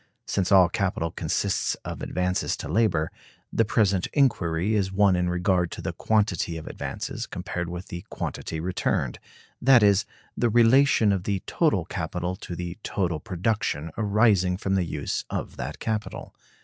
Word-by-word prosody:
Since 95 -1 -1
all 95 -2 +7
capital 85 -3 -1
consists - - -1
of - - -6
advances 90 +1 -1
to - - -6
labor, 85 -3 +1 0.4
the 115 - +3
present 100 -4 +2
inquiry 100 - +2
is 100 -3 +1
one 95 -1 +4
in 90 0 +1
regard 90 -1 +1
to - - -7
the - - -3
quantity 100 -6 0
of 80 - -8
advances - - -5
compared 85 -1 -4
with 90 +2 -7
the 85 +1 -6
quantity 80 - -4
returned; 85 -7 -1 0.4
that 125 -3 +6
is, 100 -1 +4 0.3
the 120 - +1
relation 120 0 +5
of 95 -2 -1
the 100 -3 -1
total - - +1
capital 90 +1 -3
to 90 - -7
the 90 +3 -6
total 90 -7 -1
production 90 -4 -2
arising 100 -4 +3
from 95 0 -2
the 95 -2 +2
use 75 -3 -3
of - - -4
that 70 +5 -5
capital. 110 -1 -4
95 Hz, 160 wpm, -26 LUFS, 85-105 Hz, 0.4 s, all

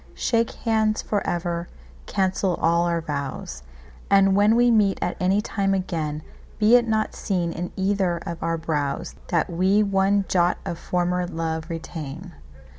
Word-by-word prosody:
Shake 230 -1 +1 0.2
hands 220 -1 +1
for 205 -2 -1
ever, 170 0 -2 0.4
cancel 190 -1 0
all 170 +1 +2
our 170 -1 0
vows; 140 - -5 0.5
And 195 -1 +5
when 205 +2 +4
we 240 0 +4
meet 205 -4 +3
at 175 - -2
any 190 +3 +2
time 195 -2 0
again, 155 -5 -3 0.3
Be 215 +2 +5
it 240 -1 +4
not 220 -1 0
seen 175 -4 -1
in 175 +1 -5
either 190 -2 0
of 170 -1 -5
our 165 0 0
browsThat 155 +1 -2
we 190 +4 +2
one 195 0 +2
jot 175 -1 +2
of 170 - -4
former 180 0 -1
love 160 -1 -3
retain. 165 +1 -7
180 Hz, 150 wpm, -24 LUFS, 165-200 Hz, 0.5 s, And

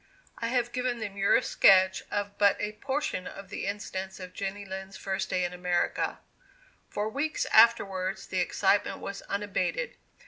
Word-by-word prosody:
I 230 - -1
have 240 0 0
given 250 0 -1
the 220 -2 -4
merest 200 0 +2
sketch 190 -1 +6
of 205 0 -2
but 200 -1 +4
a 210 - -2
portion 265 -4 -3
of 195 -1 -9
the 200 - -4
incidents 190 -2 -4
of 185 -1 -8
Jenny 200 +1 -4
Lind's 190 0 -7
first 190 0 -3
day 180 - +1
in 175 0 -2
America. 180 -1 0 0.7
For 205 +1 -2
weeks 285 +7 -1
afterwards 195 -4 +4
the 185 - -2
excitement 200 +3 +2
was 200 - -6
unabated. 205 - -2
200 Hz, 160 wpm, -29 LUFS, 190-215 Hz, 0.7 s, sketch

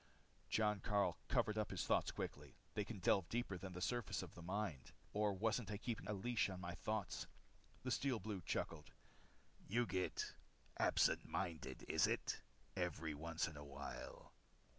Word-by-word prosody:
Jon 105 -2 +3
Karyl 100 -1 +3
covered 105 0 +3
up 105 - +1
his - - -1
thoughts - - +4
quickly. - - -4 0.2
They 105 - +1
can 110 +1 -5
delve 90 -1 +4
deeper 120 -4 0
than 95 0 -5
the 90 - -5
surface 120 +3 0
of - - -8
the 85 - -9
mind. 85 - -2 0.2
Or 105 0 +3
wasn't 110 +4 +1
I 105 - -1
keeping 115 +1 -3
a - - +2
leash 105 +2 +2
on 95 -1 -4
my 85 -1 -3
thoughts? 105 -3 -1 0.6
The 130 - 0
Steel 135 -1 +2
Blue 105 -4 -3
chuckled. 75 -1 -2 0.7
"You 120 +4 +3
get 95 -4 0 0.5
absent - - +5
minded, 85 -6 -2
is - - +5
it? - - 0 0.3
every 80 0 0
once 80 +2 0
in 80 - -7
a 75 - -6
while." 70 -1 -6
100 Hz, 165 wpm, -43 LUFS, 85-110 Hz, 0.7 s, absent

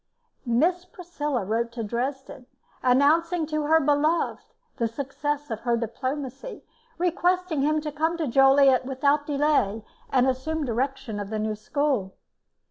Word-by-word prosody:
Miss 335 +10 +2
Priscilla 300 - -4
wrote 230 +3 -1
to 230 -1 -4
Dresden, 260 +4 -4 0.3
announcing 315 +6 +3
to 305 -1 -2
her 320 +1 +5
beloved 300 +3 +1 0.4
the 235 - +1
success 285 +3 -4
of 220 - -3
her 235 0 0
diplomacy, 265 - -5 0.3
requesting 355 -2 0
him 305 +2 +2
to 300 0 -4
come 320 +3 -1
to 325 - -1
Joliet 270 +1 +5
without 280 +3 +1
delay, 280 -8 +1 0.2
and 255 -1 +3
assume 280 +4 -1
direction 255 -2 -2
of 200 -1 -5
the 220 - -3
new 215 0 -1
school. 215 -2 -1
275 Hz, 135 wpm, -25 LUFS, 240-305 Hz, 0.4 s, her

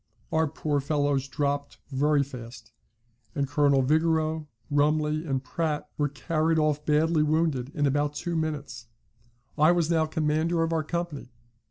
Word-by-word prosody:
Our 160 0 +2
poor 150 -1 -1
fellows 145 -1 0
dropped 145 0 -2
very 145 +2 +2
fast, 120 -4 -10 0.6
and 140 -1 0
Colonel 140 -1 +3
Vigoureux, 160 +1 +1 0.2
Rumley, 150 +2 +1
and 135 -1 -1
Pratt, 150 +2 -2
were 145 -1 0
carried 155 +4 0
off 150 -1 +1
badly 155 +1 +3
wounded 150 -4 +1
in 145 -2 +1
about 145 +1 0
two 175 +3 -3
minutes. 145 -7 -3 0.7
I 155 +3 +6
was 170 -2 +1
now 160 -1 +2
commander 160 +1 +1
of 165 0 -1
our 160 -1 +1
company. 170 -4 -4
150 Hz, 145 wpm, -27 LUFS, 140-160 Hz, 0.7 s, I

